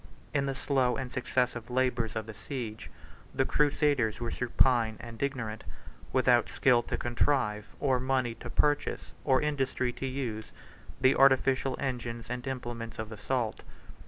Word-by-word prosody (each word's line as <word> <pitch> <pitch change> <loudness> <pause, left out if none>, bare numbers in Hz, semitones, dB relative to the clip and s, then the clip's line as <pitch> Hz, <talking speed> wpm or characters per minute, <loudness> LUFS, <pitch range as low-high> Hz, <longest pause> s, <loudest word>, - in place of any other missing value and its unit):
In 140 -1 +1
the 135 - -2
slow 130 -2 +1
and 130 -2 -4
successive 125 -2 -1
labors 125 -3 0
of 110 -1 -3
a 110 - -7
siege, 110 - -6 0.5
the - - +2
crusaders 145 -6 +2
were 120 -1 -3
supine 120 -2 +2
and 115 -1 -9
ignorant, 125 -6 -2 0.5
without 125 -2 +4
skill 125 -3 +4
to - - -3
contrive, 120 -4 0
or 130 -3 +2
money 130 -2 0
to 115 +1 -9
purchase, 145 +4 +1
or 130 0 +3
industry 135 -4 0
to 135 - -4
use, 120 -5 -4 0.5
the 130 0 +5
artificial 135 0 +4
engines 120 -3 -4
and 125 +1 -4
implements 120 -3 -5
of 110 0 -5
assault. 110 +2 -2
125 Hz, 145 wpm, -30 LUFS, 115-135 Hz, 0.5 s, the